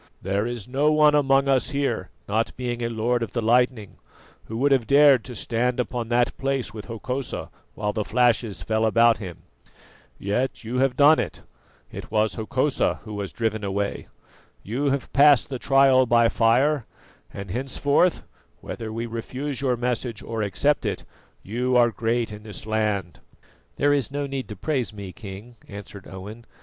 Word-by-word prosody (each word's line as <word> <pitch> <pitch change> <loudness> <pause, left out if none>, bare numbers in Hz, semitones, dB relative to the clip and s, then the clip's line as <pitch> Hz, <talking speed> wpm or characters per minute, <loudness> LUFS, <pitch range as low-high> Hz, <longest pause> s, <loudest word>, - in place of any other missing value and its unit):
There 100 +4 -1
is 120 -4 -5
no 140 +4 +2
one 150 -1 +5
among 140 -1 +3
us 135 -1 +2
here, 140 -1 -2 0.2
not 110 +2 -1
being 120 -1 -3
a 115 - -1
lord 120 +2 0
of 110 -4 -4
the 120 - -1
lightning, 120 -2 +1 0.5
who 110 - -6
would 140 +4 +2
have 130 -4 +2
dared 140 -4 +6
to 125 - -8
stand 120 +3 -1
upon 120 -2 -2
that 120 0 +2
place 135 -5 -2
with 105 -2 -8
Hokosa 125 +3 -5 0.2
while 105 0 -2
the 110 - -1
flashes 115 -2 +1
fell 110 0 0
about 115 +1 +4
him. 90 -6 -8 0.7
Yet 120 +8 -2
you 120 +3 -3
have 135 -1 +2
done 150 +2 +6
it; - - -4 0.5
it - - -8
was 110 0 +1
Hokosa 130 +5 0
who 110 - -8
was 100 -2 -4
driven 110 -2 -2
away. 100 0 -3 0.6
You 125 +8 -2
have 140 -1 -1
passed 145 -2 +5
the 130 -3 -4
trial 135 -1 +4
by 115 0 +4
fire, 125 +4 +2 0.4
and 100 -2 -7
henceforth, 140 - +1 0.4
whether 110 -1 -6
we 115 +2 -3
refuse 130 +5 -4
your 130 -3 +1
message 120 -2 -3
or 115 -1 -4
accept 105 +9 +1
it, - - -3 0.4
you 125 +4 0
are 120 -1 +4
great 115 0 -1
in 105 0 -9
this 105 -1 -7
land." 105 -5 -1 0.6
"There 145 +1 +2
is 140 -3 0
no 145 +1 -3
need 135 -1 -4
to 105 - -7
praise 130 +2 -2
me, 100 -3 -8
King," 110 +2 -10
answered 100 -1 -10
Owen. 105 +5 -10
120 Hz, 170 wpm, -24 LUFS, 110-135 Hz, 0.7 s, dared